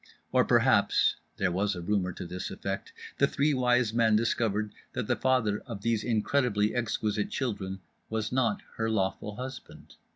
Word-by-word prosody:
Or -, -, +5 dB
perhaps -, -, +3 dB, 0.2 s
(there 95 Hz, -2 st, +1 dB
was 100 Hz, +3 st, 0 dB
a 90 Hz, -, -5 dB
rumour 95 Hz, -1 st, 0 dB
to -, -, -7 dB
this 90 Hz, +2 st, -5 dB
effect) 100 Hz, 0 st, -4 dB, 0.3 s
The 140 Hz, -, +5 dB
Three 145 Hz, +1 st, +1 dB
Wise 125 Hz, -3 st, +2 dB
Men 115 Hz, -2 st, +4 dB
discovered 110 Hz, -2 st, +1 dB, 0.2 s
that 125 Hz, -3 st, -2 dB
the -, -, +1 dB
father 125 Hz, -6 st, +1 dB
of 105 Hz, -5 st, -7 dB
these 115 Hz, -2 st, +1 dB
incredibly 110 Hz, -2 st, +1 dB
exquisite 110 Hz, -3 st, -1 dB
children 100 Hz, -7 st, -3 dB, 0.3 s
was 110 Hz, 0 st, -2 dB
not 120 Hz, -4 st, +1 dB
her 110 Hz, 0 st, 0 dB
lawful 100 Hz, 0 st, -1 dB
husband. 130 Hz, +1 st, -9 dB
110 Hz, 160 wpm, -29 LUFS, 100-125 Hz, 0.3 s, Or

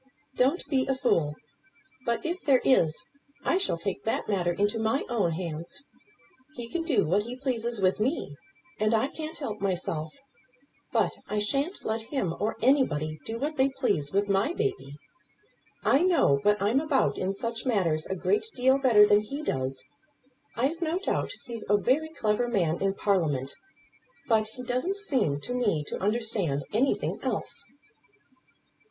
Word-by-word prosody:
"Don't 270 Hz, +8 st, +2 dB
be 265 Hz, -3 st, +1 dB
a 270 Hz, -, +1 dB
fool! 160 Hz, -, +1 dB, 0.7 s
But, 235 Hz, +5 st, 0 dB
if 345 Hz, +3 st, -2 dB
there 270 Hz, -3 st, +4 dB
is, 165 Hz, -12 st, +3 dB, 0.4 s
I 370 Hz, -, +2 dB
shall 390 Hz, -, 0 dB
take 195 Hz, +3 st, -4 dB
that 225 Hz, -, -1 dB
matter 180 Hz, -4 st, +1 dB
into 205 Hz, +5 st, 0 dB
my 225 Hz, +5 st, +1 dB
own 205 Hz, -9 st, +1 dB
hands. 170 Hz, -, -5 dB, 0.7 s
He 240 Hz, -1 st, -6 dB
can 345 Hz, -, -2 dB
do 325 Hz, -6 st, +2 dB
what 185 Hz, +7 st, +2 dB
he 240 Hz, +4 st, -6 dB
pleases 240 Hz, -4 st, -2 dB
with 190 Hz, 0 st, +2 dB
me, 225 Hz, -, -1 dB, 0.4 s
and 215 Hz, +1 st, +3 dB
I 225 Hz, +5 st, +1 dB
can't 315 Hz, +1 st, -6 dB
help 215 Hz, -8 st, -5 dB
myself; 170 Hz, -5 st, -1 dB, 0.8 s
but -, -, +2 dB
I 210 Hz, -, -2 dB
shan't 275 Hz, -, -1 dB
let 220 Hz, +1 st, -1 dB
him 195 Hz, -, -1 dB
or 215 Hz, +2 st, -1 dB
anybody 155 Hz, -, +2 dB
do 225 Hz, -, -3 dB
what 300 Hz, +5 st, -3 dB
they 265 Hz, +1 st, +4 dB
please 205 Hz, -, -1 dB
with 200 Hz, +1 st, +1 dB
my 200 Hz, -, +1 dB
baby. 390 Hz, -, -2 dB, 0.9 s
I 275 Hz, -, +4 dB
know 340 Hz, -, +4 dB
what 210 Hz, +4 st, +3 dB
I'm 210 Hz, +7 st, +2 dB
about 300 Hz, -2 st, +1 dB
in 190 Hz, +1 st, -2 dB
such 230 Hz, +4 st, -4 dB
matters 170 Hz, -9 st, +1 dB
a 190 Hz, -, -2 dB
great 415 Hz, -, +1 dB
deal 260 Hz, +2 st, +4 dB
better 230 Hz, -6 st, +7 dB
than 205 Hz, 0 st, +5 dB
he 280 Hz, +8 st, -6 dB
does. 130 Hz, -, -2 dB, 0.7 s
I've 280 Hz, +9 st, 0 dB
no 335 Hz, +1 st, 0 dB
doubt 390 Hz, -, -1 dB, 0.2 s
he's 235 Hz, -3 st, -6 dB
a 205 Hz, -, +5 dB
very 270 Hz, +9 st, +1 dB
clever 235 Hz, -5 st, 0 dB
man 175 Hz, -8 st, 0 dB
in 195 Hz, 0 st, +1 dB
Parliament; 150 Hz, -11 st, 0 dB, 0.7 s
but 220 Hz, -2 st, +3 dB
he 250 Hz, +3 st, -9 dB
doesn't 255 Hz, +11 st, -1 dB
seem 250 Hz, -, 0 dB
to 245 Hz, -, -4 dB
me 210 Hz, -11 st, +1 dB
to -, -, -5 dB
understand 205 Hz, -9 st, 0 dB
anything 255 Hz, +6 st, +1 dB
else." -, -, -3 dB
225 Hz, 165 wpm, -28 LUFS, 190-270 Hz, 0.9 s, better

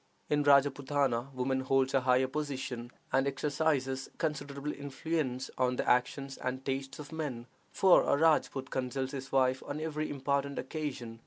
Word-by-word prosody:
In 150 Hz, 0 st, +3 dB
Rajpootana 140 Hz, -2 st, +3 dB
woman 130 Hz, 0 st, -1 dB
holds 130 Hz, 0 st, +2 dB
a 135 Hz, -, +4 dB
higher 125 Hz, +1 st, +4 dB
position, 130 Hz, -4 st, -4 dB, 0.2 s
and 135 Hz, +1 st, +3 dB
exercises 140 Hz, -1 st, 0 dB
considerable 145 Hz, -2 st, -3 dB
influence 140 Hz, -2 st, -3 dB
on 125 Hz, 0 st, +2 dB
the -, -, -2 dB
actions 135 Hz, +2 st, +1 dB
and 130 Hz, +1 st, -3 dB
tastes 135 Hz, 0 st, -3 dB
of 150 Hz, 0 st, -9 dB
men, 145 Hz, -7 st, -4 dB, 0.3 s
for 190 Hz, -2 st, +6 dB
a 140 Hz, -, +3 dB
Rajpoot 150 Hz, -4 st, +2 dB
consults 130 Hz, +1 st, -2 dB
his 135 Hz, -2 st, -6 dB
wife 130 Hz, -1 st, +3 dB
on 145 Hz, -, -5 dB
every 155 Hz, -1 st, -2 dB
important 140 Hz, 0 st, -1 dB
occasion. 130 Hz, -7 st, -4 dB
135 Hz, 150 wpm, -31 LUFS, 130-145 Hz, 0.3 s, for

